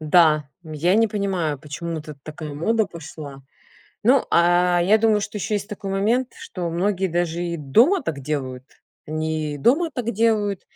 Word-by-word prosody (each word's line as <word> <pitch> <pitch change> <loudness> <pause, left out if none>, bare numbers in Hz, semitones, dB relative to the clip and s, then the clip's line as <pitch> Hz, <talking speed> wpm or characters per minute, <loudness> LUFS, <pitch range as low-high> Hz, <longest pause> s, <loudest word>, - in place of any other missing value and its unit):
да. 155 -2 +4
Я 160 +3 0
не 225 +1 +4
понимаю, 185 -8 -1
почему 160 +3 -5
тут 150 -1 -10
такая 155 -1 -7
мода 220 +7 +1
пошла. 150 -5 -10 0.6
Ну, 260 +3 +5
а, 175 +1 +4
я 210 +5 +4
думаю 215 -1 +3
что 210 +1 -5
еще 210 - -2
есть 205 +1 -3
такой 200 -2 -6
момент, 230 +6 +1
что 175 -2 -5
многие 190 +2 0
даже 170 0 -1
и 170 -1 -2
дома 235 - +3
так 145 - -4
делают. 130 -3 -4 0.4
Они 155 -1 -2
и - - -7
дома 305 - +3
так 235 -2 -2
делают, 210 -3 +1
175 Hz, 165 wpm, -22 LUFS, 155-210 Hz, 0.6 s, Ну